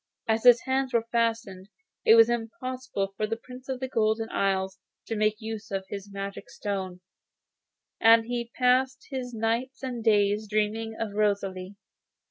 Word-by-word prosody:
As 225 Hz, +1 st, +1 dB
his 245 Hz, -1 st, +8 dB
hands 265 Hz, -1 st, -1 dB
were 230 Hz, -1 st, +2 dB
fastened, 225 Hz, -5 st, -1 dB, 0.4 s
it 225 Hz, -, +8 dB
was 225 Hz, -1 st, +8 dB
impossible 240 Hz, -3 st, -3 dB
for 215 Hz, +1 st, -1 dB
the 225 Hz, +1 st, -2 dB
Prince 255 Hz, +2 st, -12 dB
of 260 Hz, -1 st, -2 dB
the 260 Hz, -, -3 dB
Golden 225 Hz, -2 st, 0 dB
Isle 190 Hz, -1 st, 0 dB, 0.3 s
to 225 Hz, -, -3 dB
make 215 Hz, 0 st, +2 dB
use 220 Hz, -2 st, -6 dB
of 195 Hz, -1 st, -3 dB
his 200 Hz, 0 st, -7 dB
magic 200 Hz, 0 st, -6 dB
stone, 190 Hz, -3 st, -4 dB, 1.0 s
and 225 Hz, 0 st, +6 dB
he 235 Hz, 0 st, -4 dB
passed 260 Hz, +1 st, +2 dB
his 255 Hz, -2 st, -4 dB
nights 235 Hz, +4 st, -2 dB
and 245 Hz, -3 st, -4 dB
days 210 Hz, -1 st, +3 dB
dreaming 215 Hz, +1 st, -1 dB
of 220 Hz, -3 st, -3 dB
Rosalie. 200 Hz, -2 st, -1 dB
225 Hz, 155 wpm, -27 LUFS, 205-245 Hz, 1.0 s, his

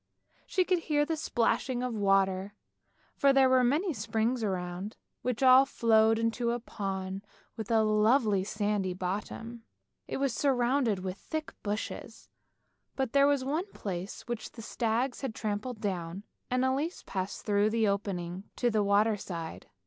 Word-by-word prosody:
She 370 Hz, -1 st, +1 dB
could 365 Hz, -1 st, +2 dB
hear 295 Hz, -3 st, +1 dB
the 325 Hz, +1 st, -1 dB
splashing 250 Hz, -2 st, 0 dB
of 250 Hz, -1 st, -2 dB
water, 195 Hz, -1 st, +1 dB, 0.6 s
for 280 Hz, -1 st, +4 dB
there 270 Hz, -1 st, +5 dB
were 255 Hz, -1 st, +4 dB
many 310 Hz, +9 st, +2 dB
springs 225 Hz, +2 st, -1 dB
around, 185 Hz, +1 st, -3 dB, 0.2 s
which 250 Hz, +1 st, -1 dB
all 260 Hz, +1 st, +8 dB
flowed 225 Hz, -4 st, +3 dB
into 230 Hz, +1 st, 0 dB
a 240 Hz, +1 st, 0 dB
pond 195 Hz, -3 st, -4 dB, 0.3 s
with 220 Hz, -2 st, -6 dB
a 225 Hz, -1 st, +4 dB
lovely 215 Hz, -1 st, +3 dB
sandy 205 Hz, -2 st, -1 dB
bottom. 210 Hz, +5 st, -4 dB, 0.5 s
It -, -, -3 dB
was 270 Hz, -2 st, 0 dB
surrounded 245 Hz, -5 st, +1 dB
with 190 Hz, +1 st, -4 dB
thick 315 Hz, -1 st, -5 dB
bushes, 210 Hz, +1 st, -5 dB, 0.7 s
but 265 Hz, -3 st, -2 dB
there 280 Hz, 0 st, +6 dB
was 285 Hz, -2 st, +2 dB
one 320 Hz, +9 st, -2 dB
place 190 Hz, 0 st, -5 dB
which 235 Hz, -2 st, -5 dB
the 225 Hz, -, -9 dB
stags 235 Hz, +3 st, -1 dB
had 260 Hz, -5 st, -4 dB
trampled 215 Hz, +2 st, -3 dB
down 185 Hz, -2 st, -3 dB, 0.3 s
and 255 Hz, +1 st, +1 dB
Elise 280 Hz, +7 st, -1 dB
passed 190 Hz, -1 st, -4 dB
through 205 Hz, 0 st, +3 dB
the 225 Hz, 0 st, +2 dB
opening 190 Hz, -2 st, -2 dB
to 240 Hz, -1 st, +1 dB
the 215 Hz, -1 st, +2 dB
water 205 Hz, +2 st, +3 dB
side. 165 Hz, -4 st, -6 dB
220 Hz, 155 wpm, -30 LUFS, 200-255 Hz, 0.7 s, all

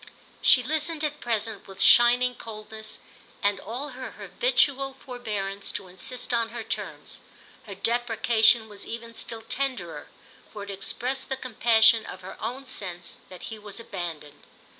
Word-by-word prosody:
She 250 Hz, -, +6 dB
listened 310 Hz, +3 st, -1 dB
at 300 Hz, 0 st, -1 dB
present 225 Hz, -3 st, -2 dB
with 195 Hz, 0 st, -11 dB
shining 245 Hz, +3 st, +7 dB
coldness 220 Hz, -1 st, -7 dB, 0.5 s
and 200 Hz, -1 st, +2 dB
all 250 Hz, +8 st, -5 dB
her 255 Hz, -1 st, -7 dB
habitual 275 Hz, -, +2 dB
forbearance 210 Hz, -7 st, -4 dB
to 195 Hz, -, -5 dB
insist 245 Hz, +8 st, -1 dB
on 230 Hz, -1 st, +2 dB
her 235 Hz, 0 st, -6 dB
terms; -, -, -5 dB, 0.5 s
her 200 Hz, -, -7 dB
deprecation 225 Hz, +1 st, +4 dB
was 205 Hz, -2 st, -10 dB
even 230 Hz, 0 st, -7 dB
still 225 Hz, 0 st, -3 dB
tenderer, 225 Hz, -, -3 dB, 0.4 s
for 205 Hz, -, -7 dB
it 200 Hz, -, -6 dB
expressed 245 Hz, +7 st, -2 dB
the 265 Hz, -, -1 dB
compassion 225 Hz, -2 st, +5 dB
of 185 Hz, -, -8 dB
her 185 Hz, -, -8 dB
own 250 Hz, +5 st, -4 dB
sense 175 Hz, -7 st, -6 dB
that 185 Hz, -2 st, -11 dB
he 220 Hz, -, -8 dB
was 205 Hz, 0 st, -9 dB
abandoned. 160 Hz, -9 st, -6 dB
225 Hz, 145 wpm, -27 LUFS, 200-250 Hz, 0.5 s, shining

